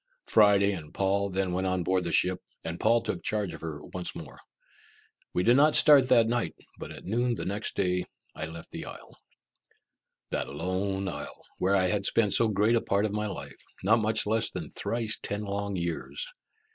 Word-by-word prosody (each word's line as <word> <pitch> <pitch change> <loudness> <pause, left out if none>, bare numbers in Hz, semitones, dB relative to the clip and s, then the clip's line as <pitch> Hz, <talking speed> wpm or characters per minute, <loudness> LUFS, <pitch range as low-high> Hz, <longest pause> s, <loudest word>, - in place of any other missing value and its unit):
Friday 100 -2 +5
and 80 -6 -7
Paul 100 +1 +1
then 95 -1 -1
went 95 +1 -1
on 95 -1 0
board 95 +1 +1
the 85 - -2
ship, 90 +2 +2 0.2
and 80 +1 -5
Paul 115 0 +3
took - - -3
charge 105 -3 -1
of - - -9
her 75 -3 -6
once 90 -1 -4
more. 80 -4 -9 0.9
We 90 - 0
did 120 +4 +5
not 150 +3 +5
start 145 -4 +7
that 115 -3 +6
night, 120 +1 -1 0.2
but - - -6
at - - -10
noon 120 +4 0
the - - -5
next 100 +3 -2
day 90 -1 0 0.3
I 80 - -4
left 80 0 -10
the - - -6
isle! - - -11 1.2
That - - -2
lone 95 +2 -2
isle, - - -6
where 95 +2 +2
I 95 -1 +3
had 100 +2 +2
spent 105 -4 +2
so 115 - +4
great 105 +2 +2
a 115 - +2
part 100 +1 +1
of 105 - -2
my 105 0 -1
life 100 - -8 0.2
not 110 +4 +4
much 110 0 +1
less 110 +1 +1
than 85 -5 -7
thrice 115 -1 -1
ten 105 +1 -1
long 100 0 -3
years. 85 - -3
100 Hz, 195 wpm, -28 LUFS, 90-110 Hz, 1.2 s, start